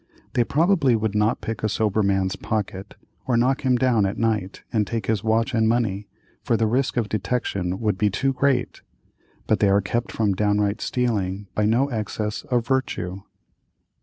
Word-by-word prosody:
They 120 - +3
probably 150 -2 +3
would 110 -2 -1
not 105 +2 +1
pick 115 -1 -4
a 110 - 0
sober 110 0 +1
man's 95 -2 +1
pocket, 100 -2 -4 0.3
or 125 -3 +2
knock 130 +3 +2
him 130 -1 +3
down 120 -5 +2
at 100 +4 -4
night 105 -4 -1
and 105 -3 +1
take 115 0 -3
his 110 -2 0
watch 115 +3 +1
and 110 -1 +3
money, 105 -4 0 0.3
for 115 - +1
the 115 - +2
risk 125 +3 0
of 115 -3 +1
detection 95 -4 -2
would 105 -4 -1
be 105 - +3
too 135 +7 0
great; 140 -1 0 0.6
but - - +1
they 100 - +4
are 100 +1 +4
kept 115 +4 -2
from 105 -3 +1
downright 105 +1 +1
stealing 105 -6 -1
by 105 - +1
no 120 +5 +3
excess 105 -2 -3
of 120 -2 0
virtue. 105 -8 -2
110 Hz, 180 wpm, -23 LUFS, 100-120 Hz, 0.6 s, they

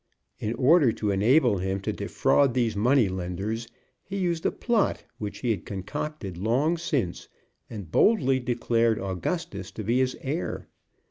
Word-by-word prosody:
In 110 +2 -2
order 140 -1 +5
to 105 -2 -1
enable 110 +2 +3
him 95 +1 -1
to - - -2
defraud 135 -4 +2
these 120 -4 +1
money 120 +2 +3
lenders 95 +5 -4 0.4
he 200 - -5
used 175 -4 0
a - - 0
plot 235 -4 0 0.2
which 105 -1 -5
he 120 - +1
had 100 -4 -2
concocted 100 - -5
long 130 - +2
since, 140 - -2 0.4
and 100 -8 -8
boldly 135 - +3
declared 115 -2 +1
Augustus 95 - -3
to 110 - -6
be 120 +5 +1
his 130 0 0
heir. 150 +6 -3
115 Hz, 150 wpm, -26 LUFS, 100-140 Hz, 0.4 s, order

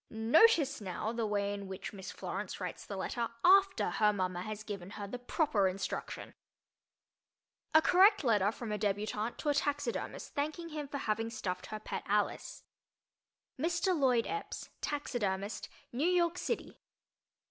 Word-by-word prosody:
Notice, 280 - +4
now, 195 +3 -3
the 230 -2 -1
way 205 -1 0
in 200 -1 -6
which 190 +2 -6
Miss 195 -1 -7
Florence 190 +1 -5
writes 180 -2 -5
the 200 - -5
letter 230 +4 -2 0.2
after, 385 +1 +5
her 210 -1 +4
mama 185 -3 -2
has 215 +2 -5
given 200 -4 -6
her 205 - -4
the 245 +5 -6
proper 245 - +2
instruction. 190 +1 -4 1.4
A 315 - +8
Correct 395 +1 +6
Letter 210 -5 +3
from 225 -1 -6
a 210 - -1
Débutante 210 +2 -1
to 300 - -2
a - - +4
Taxidermist 285 -4 -2
Thanking 310 +4 -2
Him 300 -2 -5
for 280 - -4
Having 225 -2 -1
Stuffed 185 -5 -4
Her 215 - -5
Pet - - -4
Alice 205 0 -1 1.0
Mr. 345 +4 +1
Lloyd 255 -6 +3
Epps, 420 0 -5
Taxidermist, 210 -9 -2 0.2
New 280 +8 +1
York 355 -1 +2
City. - - -3
225 Hz, 150 wpm, -33 LUFS, 200-295 Hz, 1.4 s, A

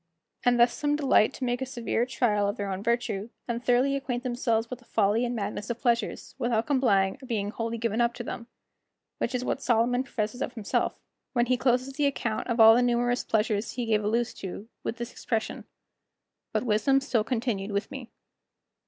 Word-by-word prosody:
And 245 -1 +3
thus 240 0 +5
some 295 0 0
delight 275 -6 +4
to - - -6
make 245 0 -1
a - - 0
severe 240 -2 -1
trial 220 -5 +1
of 205 +3 -2
their 200 -1 -3
own 190 0 -3
virtue, 225 -2 -1 0.2
and 235 0 -3
thoroughly 255 +3 +3
acquaint 255 -3 -3
themselves 240 -3 0
with 250 +1 -7
the 240 - -21
folly 210 +3 +2
and 240 0 -2
madness 210 0 -4
of 235 0 -3
pleasures, 235 -2 0
without 235 -2 +1
complying 235 -6 +2
or 260 - -10
being 205 -4 -1
wholly 230 +1 -3
given 230 0 0
up 235 0 +1
to 240 - -5
them; 235 0 -6 0.7
which 250 - -1
is 250 0 -2
what 270 - -1
Solomon 245 +1 +2
professes 225 -1 -3
of 250 - -2
himself 220 -4 -1 0.3
when 240 -2 +3
he 255 +1 +2
closes 255 +1 +1
the 285 +1 +2
account 240 -5 -2
of 235 -1 -1
all 225 0 +10
the 240 - +4
numerous 245 0 +1
pleasures 215 -1 0
he 245 -1 -2
gave 215 -2 +1
a - - 0
loose 235 +2 0
to, 195 +3 -7 0.2
with 235 - -3
this 240 0 -5
expression: 220 -2 -3 0.9
"But - - 0
wisdom 250 +4 +3
still 260 -5 0
continued 225 -4 -2
with 200 +1 -2
me." 255 -3 -7
235 Hz, 205 wpm, -27 LUFS, 220-250 Hz, 0.9 s, all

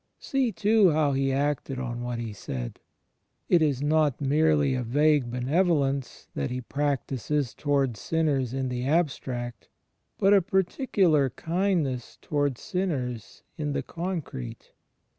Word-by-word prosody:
See, 265 -4 0
too, 210 0 +4
how 150 -2 +2
He 135 0 +1
acted 140 -1 -1
on 120 -1 -4
what 120 0 -3
He 115 -2 -4
said. 60 -11 -6 0.7
It 175 - +5
is 145 -3 +1
not 150 -2 +2
merely 145 0 +3
a 130 - -1
vague 145 +2 +2
benevolence 140 +1 0
that 70 - -2
He 125 - -3
practises 140 0 -1
towards 140 -7 0
sinners 145 -7 0
in 130 0 -2
the 125 0 -3
abstract; 135 -6 -1 0.5
but 195 +1 +4
a 200 - +6
particular 185 - +2
kindness 165 - -1
towards 145 -4 -1
sinners 135 - -3 0.2
in 150 -1 -1
the - - -1
concrete. 165 - -5
145 Hz, 130 wpm, -27 LUFS, 125-160 Hz, 0.7 s, a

